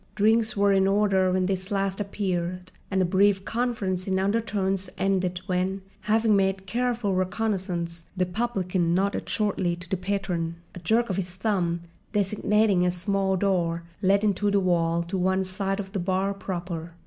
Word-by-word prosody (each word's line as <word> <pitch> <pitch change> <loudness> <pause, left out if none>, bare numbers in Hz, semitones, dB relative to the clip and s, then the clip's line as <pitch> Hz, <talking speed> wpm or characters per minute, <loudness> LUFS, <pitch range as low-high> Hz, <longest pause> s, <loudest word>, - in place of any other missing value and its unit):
Drinks 220 +2 +3
were 200 0 +4
in 190 0 +4
order 195 -2 +3
when 185 0 +1
this 190 0 -2
last 195 0 -1
appeared; 185 -3 -3 0.2
and 190 -1 +2
a - - +2
brief 195 +1 +3
conference 220 -6 -1
in 190 -1 +1
undertones 195 -2 0
ended 185 -2 0
when, 185 +1 -1 0.2
having 215 +2 +2
made 195 -1 +1
careful 235 -1 0
reconnaissance, 185 -3 -2
the 180 - +2
publican 180 -4 0
nodded 195 +2 0
shortly 195 -5 0
to 175 +1 -10
the 190 - -1
patron, 180 -3 -2 0.2
a - - -8
jerk 225 +5 +1
of 190 - -2
his 180 -2 -3
thumb 185 -4 0 0.3
designating 205 -1 +2
a 180 - +3
small 190 +1 0
door 175 -3 0 0.2
let 200 +1 +3
into 205 0 +2
the 200 0 +3
wall 170 -2 +1
to 185 +3 -3
one 190 +1 +2
side 195 +1 -2
of 190 -1 -5
the 200 - -2
bar 190 +2 0
proper. 175 -4 -5
190 Hz, 165 wpm, -26 LUFS, 180-205 Hz, 0.3 s, were